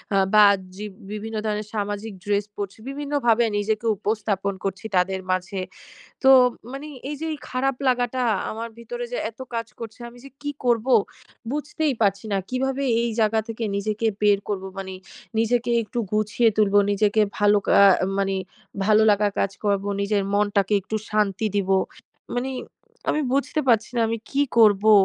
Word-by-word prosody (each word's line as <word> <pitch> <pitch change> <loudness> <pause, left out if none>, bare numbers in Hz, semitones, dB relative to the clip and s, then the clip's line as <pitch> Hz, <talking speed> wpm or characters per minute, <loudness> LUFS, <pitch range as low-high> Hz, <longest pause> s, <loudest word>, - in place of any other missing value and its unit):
আ - - +4 0.2
বা, 210 0 +8
আ - - +4 0.2
জি 210 +2 -6 0.3
বিভিন্ন 215 +1 -5
ধরনের 210 0 -2
সামাজিক 205 +1 -3
ড্রেস 205 0 +1
পরছি, 200 -1 -5
বিভিন্নভাবে 275 -5 +1
নিজেকে 215 +2 -1
উপস্থাপন 205 -2 -1
করছি 195 +2 -4
তাদের 190 +1 +2
মাঝে। 185 +1 -2 0.6
তো 265 - +6 0.4
মানি 275 +3 -7 0.2
এইযে 300 +2 -4 0.2
খারাপ 265 +1 0
লাগাটা 250 0 +1 0.3
আমার 230 +1 -5
ভিতরে 485 - -5
যে - - -1
এতো 230 +3 -9
কাজ 230 -1 -2
করছে, 225 0 -8
আমি 240 - -16
যে - - -10
কি 290 0 -3
করবো 240 +1 +3 0.6
বুঝতেই 295 0 -1
পারছি 200 0 +1
না। 200 - +2
কিভাবে 265 +2 -1 0.2
এই 235 - 0
জায়গা 220 0 +3
থেকে 230 0 -5
নিজেকে 215 +2 -2 0.2
বের 205 -1 +4
করবো। 190 -2 -2
মানি 190 -1 -6 0.4
নিজেকে 240 +1 +1
একটু 240 +3 -4
গুছিয়ে 215 +2 +2
তুলবো, 205 -1 +4
নিজেকে 205 +1 +2 0.2
ভালো 205 0 +4
কা - - +2 0.3
আ - - +2
মানি 195 -1 0 0.5
ভালো 215 +1 +5
লাগা 205 0 +2
কাজ 195 - +1
করবো। 200 0 +1
নিজের 200 0 +1
মনটাকে 205 0 +2
একটু 190 +4 -5
শান্তি 210 0 0
দিবো। 195 -1 +2 0.6
মানি 255 +2 -1 0.6
আমি 305 - +1
বুঝতে 280 +2 0
পারছি 230 -2 +3
না 235 - +2
আমি 230 +1 -1
কি 280 - +2 0.2
করবো? 215 -1 +6
215 Hz, 160 wpm, -23 LUFS, 200-240 Hz, 0.6 s, বা